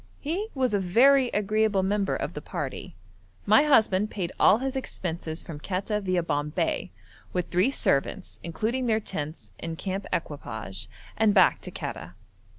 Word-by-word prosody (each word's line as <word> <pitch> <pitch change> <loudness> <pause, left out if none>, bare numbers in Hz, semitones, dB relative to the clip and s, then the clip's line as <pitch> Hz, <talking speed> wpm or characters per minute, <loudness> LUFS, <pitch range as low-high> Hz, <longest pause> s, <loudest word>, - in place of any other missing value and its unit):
He 350 +9 -2
was 255 -4 +1
a 205 - +3
very 255 +9 +5
agreeable 210 -2 +1
member 200 0 +1
of - - -3
the - - -6
party. - - -5 0.5
My - - +6
husband 215 -7 +4
paid 185 -5 -3
all 205 - +7
his 265 +2 -3
expenses 170 -10 -4
from 155 -3 -8
Quetta 200 +5 -2
viâ 185 -3 0
Bombay, 150 - -1 0.4
with 180 -2 -2
three 185 +8 +3
servants, 190 - -1
including 225 +9 -2
their 220 -1 +3
tents 150 - -6
and 165 -1 -5
camp 195 +2 -4
equipage, 110 - -4 0.3
and 220 -2 +3
back - - +5
to - - -5
Quetta. - - -6
195 Hz, 155 wpm, -27 LUFS, 165-220 Hz, 0.5 s, all